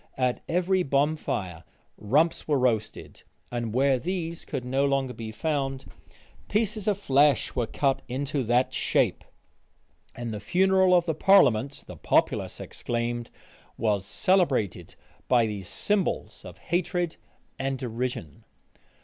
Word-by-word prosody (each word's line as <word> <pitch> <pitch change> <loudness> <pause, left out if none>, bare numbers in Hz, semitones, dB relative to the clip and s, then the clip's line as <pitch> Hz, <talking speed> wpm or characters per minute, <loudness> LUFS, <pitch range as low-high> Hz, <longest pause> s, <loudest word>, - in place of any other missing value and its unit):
At 125 -1 0
every 185 +2 +2
bonfire 140 - -1 0.3
rumps 150 +10 +1
were 150 -2 +2
roasted; 115 -4 -1 0.3
and 120 -2 -3
where 130 +2 +2
these 170 +1 -4
could 125 - -4
no 135 +2 +1
longer 135 -2 0
be 110 -2 -7
found, 135 +1 -2 0.6
pieces 215 0 0
of 205 -2 +2
flesh 145 -5 +3
were 120 -3 0
cut 135 +2 0
into 135 +2 -2
that 120 +3 +2
shape; - - +1 0.9
and 120 -2 -5
the 105 - -4
funeral 185 - +3
of 175 -1 +3
the 165 - 0
parliament 140 - +4
(the - - -10
populace - - +1
exclaimed) 120 0 -3 0.5
was 105 -4 +1
celebrated 125 - 0 0.3
by 120 -3 +4
these 100 -4 -5
symbols 200 - -1
of - - -10
hatred 175 -1 -1 0.4
and 135 0 -1
derision. 120 - -4
135 Hz, 125 wpm, -26 LUFS, 120-170 Hz, 0.9 s, parliament